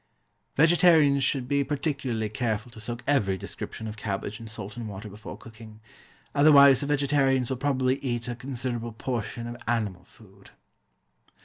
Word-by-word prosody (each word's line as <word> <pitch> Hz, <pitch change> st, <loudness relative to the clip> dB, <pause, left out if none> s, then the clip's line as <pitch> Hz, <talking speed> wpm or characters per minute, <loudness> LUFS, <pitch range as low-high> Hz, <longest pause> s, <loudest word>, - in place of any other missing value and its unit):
Vegetarians 160 Hz, -3 st, +5 dB
should 130 Hz, -3 st, 0 dB
be 140 Hz, +1 st, +2 dB
particularly 135 Hz, -5 st, -2 dB
careful 110 Hz, +1 st, -2 dB
to 110 Hz, -, -12 dB
soak 120 Hz, +2 st, -5 dB
every 105 Hz, -10 st, +2 dB
description 110 Hz, +4 st, -7 dB
of 110 Hz, 0 st, -7 dB
cabbage 105 Hz, +1 st, -4 dB
in 115 Hz, -, -9 dB
salt 105 Hz, -2 st, -8 dB
and 115 Hz, -3 st, -6 dB
water 100 Hz, +2 st, -8 dB
before 105 Hz, +2 st, -9 dB
cooking. 110 Hz, -1 st, -13 dB, 0.5 s
Otherwise 140 Hz, -2 st, +7 dB
the 145 Hz, -, -2 dB
vegetarians 135 Hz, -3 st, +2 dB
will 130 Hz, -, -1 dB
probably 130 Hz, -1 st, +1 dB
eat 120 Hz, -3 st, -3 dB
a 120 Hz, -, -3 dB
considerable 120 Hz, -2 st, -4 dB
portion 115 Hz, 0 st, -4 dB
of 120 Hz, 0 st, -6 dB
animal 105 Hz, -6 st, -1 dB
food. 100 Hz, 0 st, -19 dB
120 Hz, 150 wpm, -27 LUFS, 110-140 Hz, 0.5 s, Otherwise